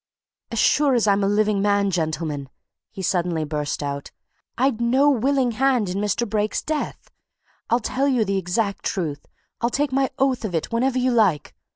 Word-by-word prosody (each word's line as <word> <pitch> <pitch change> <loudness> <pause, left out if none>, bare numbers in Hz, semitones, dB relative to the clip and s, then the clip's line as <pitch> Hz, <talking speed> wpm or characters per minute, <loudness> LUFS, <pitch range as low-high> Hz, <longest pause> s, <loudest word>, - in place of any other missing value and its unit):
"As 230 - -5
sure 280 +4 +3
as 235 - +2
I'm 200 -1 +3
a - - +2
living 205 0 +2
man, 200 -1 +2
gentlemen!" 155 -4 -2 0.4
he 190 - -8
suddenly 175 -3 0
burst 150 -1 -3
out, 140 0 -4 0.5
"I'd 250 -2 +1
no 265 +5 +4
willing 265 0 +1
hand 250 -3 +1
in 185 +2 -2
Mr. 210 +3 0
Brake's 210 0 -1
death! 310 -1 -4 0.6
I'll 235 - +3
tell 265 +4 -1
you 250 -5 +2
the 195 0 0
exact 200 +3 -2
truth; 155 -7 -3 0.3
I'll 235 - +2
take 285 +2 -1
my 270 0 +1
oath 265 -3 +1
of 195 -6 -3
it 160 - -2
whenever 255 +3 +1
you 255 0 +2
like. 200 -11 +2
215 Hz, 180 wpm, -23 LUFS, 180-255 Hz, 0.6 s, no